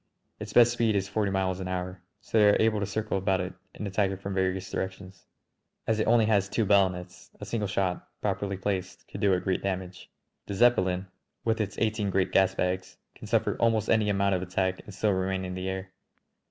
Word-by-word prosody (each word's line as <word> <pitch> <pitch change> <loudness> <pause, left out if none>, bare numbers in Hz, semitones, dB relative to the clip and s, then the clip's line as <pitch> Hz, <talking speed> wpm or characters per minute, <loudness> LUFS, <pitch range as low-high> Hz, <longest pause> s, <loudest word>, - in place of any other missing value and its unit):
Its 105 0 -6
best 120 +2 +6
speed 115 -3 +1
is 95 -1 0
forty 100 +1 0
miles 95 -1 0
an 95 - -4
hour, 90 0 -4 0.2
so - - -7
they 105 -1 +7
are 105 - +4
able 110 -1 +3
to 100 - -2
circle 110 -2 -2
about 95 0 +1
it 90 +1 -3 0.2
and 105 - -5
attack 100 0 +1
it 95 -1 -5
from 100 0 -5
various 95 0 0
directions. 95 0 -6 0.6
As 110 -1 +1
it - - +1
has - - +4
only 115 -2 +5 0.2
two 115 - 0
ballonets, 95 -2 +1
a - - -6
single 105 -3 -2
shot, 95 -2 -1
properly 100 -1 -2
placed, 95 -1 -3
could 100 - -8
do 100 -2 +4
it 90 - 0
great 95 -1 0
damage. 95 -1 -4 0.4
The 100 - -4
Zeppelin, 95 -5 +3 0.4
with 110 -1 +1
its 105 - -3
eighteen 110 -2 0
great 95 -1 +1
gasbags, 95 -1 +1 0.2
can - - -11
suffer - - +1
almost 110 -2 +2
any 110 -2 +3
amount 100 -1 +2
of 90 - 0
attack 95 0 -1
and - - -11
still 105 +2 0
remain 95 0 -1
in 90 - -5
the 95 +1 -3
air. 95 0 -5
95 Hz, 210 wpm, -28 LUFS, 95-105 Hz, 0.6 s, they